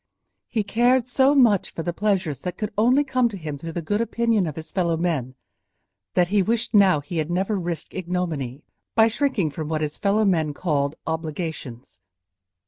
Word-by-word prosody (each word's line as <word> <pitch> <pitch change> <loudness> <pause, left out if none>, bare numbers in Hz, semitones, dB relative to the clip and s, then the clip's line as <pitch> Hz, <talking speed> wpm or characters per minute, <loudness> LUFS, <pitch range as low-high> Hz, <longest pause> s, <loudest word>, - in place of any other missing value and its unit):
He 220 -3 0
cared 240 +4 +2
so 265 +3 +3
much 230 -8 +4
for 165 - -3
the 175 - -2
pleasures 185 - 0
that 180 +3 -5
could 210 0 -4
only 250 +7 +4
come 255 -3 +1
to 205 - -7
him 150 -5 -6
through 165 +2 -6
the 170 - -4
good 205 +7 0
opinion 230 -4 +1
of 150 - -5
his 160 0 -8
fellow 170 -3 0
men, 150 -7 -1 0.8
that 175 -1 +3
he 205 0 +3
wished 225 +4 -1
now 190 -7 +5
he 155 +4 -6
had 155 +1 -2
never 190 +4 0
risked 175 -4 -4
ignominy 165 -7 -3 0.3
by 225 0 +6
shrinking 230 - 0
from 155 +1 -5
what 155 -1 -1
his 150 -1 -3
fellow 210 +1 +2
men 160 -6 +1
called 145 -4 0
obligations. 160 - -5
180 Hz, 185 wpm, -23 LUFS, 155-215 Hz, 0.8 s, by